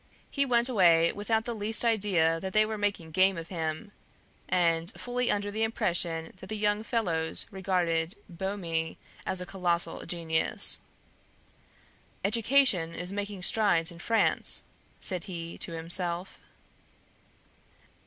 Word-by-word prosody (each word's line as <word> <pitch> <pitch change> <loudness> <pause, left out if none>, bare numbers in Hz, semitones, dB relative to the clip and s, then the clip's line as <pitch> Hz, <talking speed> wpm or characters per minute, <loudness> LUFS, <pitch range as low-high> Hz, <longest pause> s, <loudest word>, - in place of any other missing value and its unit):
He 280 -1 +1
went 240 -1 +2
away 170 -8 +4
without 220 +2 -1
the 240 - -3
least 220 +2 +3
idea 190 -8 +2
that 190 +2 -6
they 215 0 +4
were 220 0 -4
making 200 -6 -2
game 190 +2 +3
of 165 0 -7
him, 165 +3 -4 0.6
and 170 0 +1
fully 250 0 -2
under 205 0 0
the 215 +2 -3
impression 170 -7 -1
that 190 - -11
the 215 - -3
young 210 0 +1
fellows 180 -9 +2
regarded 180 -2 -1
Boehme 170 -3 -3 0.3
as 185 - 0
a - - -5
colossal 175 -2 -2
genius. 165 -2 0 1.5
"Education 220 -6 +3
is 180 +1 -5
making 200 -2 -5
strides 180 -5 +4
in 170 - -12
France," 225 +5 +2 0.4
said 180 -2 0
he 170 -3 -6
to 170 - -4
himself. 170 +2 -1
185 Hz, 130 wpm, -28 LUFS, 165-210 Hz, 1.5 s, away